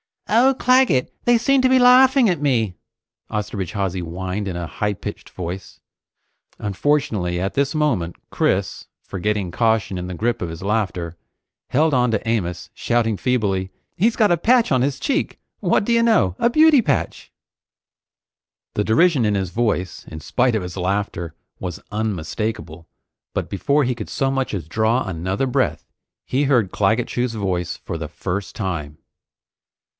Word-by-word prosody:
"Oh, 260 +4 +5
Claggett, 255 - +3
they 240 0 +5
seem 270 +3 +3
to 260 - +3
be 260 - +5
laughing 255 0 +6
at 170 -5 -1
me!" 115 -9 +1 0.6
Osterbridge 100 -3 -3
Hawsey 95 -3 -1
whined 90 +4 -4
in 90 - -3
a 85 0 -3
high 105 +6 -2
pitched - - -8
voice. 90 +1 -7 0.8
Unfortunately, 100 -5 0
at 95 +2 -2
this 140 +1 0
moment 120 - 0 0.2
Chris, - - -1 0.2
forgetting 100 -1 -2
caution 110 -2 +1
in 90 0 -4
the 90 - -5
grip 115 +7 -1
of 90 - -2
his 80 +2 -8
laughter, 90 -5 -2 0.5
held 155 +3 +2
on 125 -2 +3
to 110 0 -2
Amos 95 -5 -2
shouting 115 -3 0
feebly: 100 -7 0 0.3
"He's 225 +6 +2
got 215 -4 +3
a 175 - +4
patch 235 +5 +3
on 130 -2 +3
his 135 +1 -1
cheek! 275 - -1 0.2
What - - +2
do 235 - -1
you 230 0 +4
know 220 - +3
a 235 - +3
beauty 310 +1 +6
patch!" 145 -10 -2 1.4
The 105 - 0
derision 135 +2 +3
in 105 -1 +1
his 95 -2 -1
voice, 105 -4 -2
in 80 0 -8
spite 125 - +1
of 105 - -1
his 90 +1 -7
laughter, 95 -3 -2 0.2
was 90 -2 -5
unmistakable, 100 -4 -3 0.5
but - - -2
before 140 +9 +1
he 125 0 0
could 120 - -7
so 135 -1 0
much 135 -3 -1
as 90 -7 -3
draw 110 +7 +1
another 95 +7 -2
breath, 125 - 0 0.4
he 135 +3 0
heard 120 -9 +2
Claggett 110 +4 +1
Chew's 125 -1 -1
voice 90 -4 -2
for 85 - -6
the 80 -1 -5
first 95 +5 -4
time. 80 -7 -4
110 Hz, 160 wpm, -21 LUFS, 90-140 Hz, 1.4 s, laughing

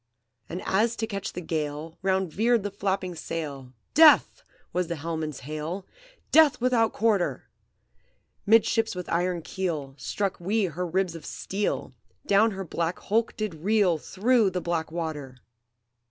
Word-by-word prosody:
"And 175 - -5
as 220 +4 +2
to 225 - -2
catch 205 -1 -5
the 180 - -5
gale 155 -1 -4
Round 190 -3 0
veered 230 +1 +2
the 205 - -3
flapping 190 -2 -2
sail, 145 -6 -5 0.2
'Death!' 310 0 +6 0.3
was 180 -1 0
the 170 - -3
helmsman's 160 -2 -4
hail, 155 +7 -5 0.5
'Death 310 -2 +6
without 240 -2 +2
quarter!' 210 -5 0 1.0
Midships 225 0 +4
with 180 -1 -5
iron 175 0 0
keel 160 -7 -3
Struck 200 -3 -2
we 200 +4 +1
her 180 +1 -3
ribs 185 0 0
of 165 - -9
steel; 200 +2 -3 0.3
Down 205 +3 +4
her 195 -2 -5
black 170 +1 -2
hulk 225 +3 0
did 215 -4 -2
reel 185 0 +2
Through 220 - +2
the 185 -1 -2
black 170 -2 -2
water! 155 -6 -5
185 Hz, 145 wpm, -26 LUFS, 165-210 Hz, 1.0 s, Death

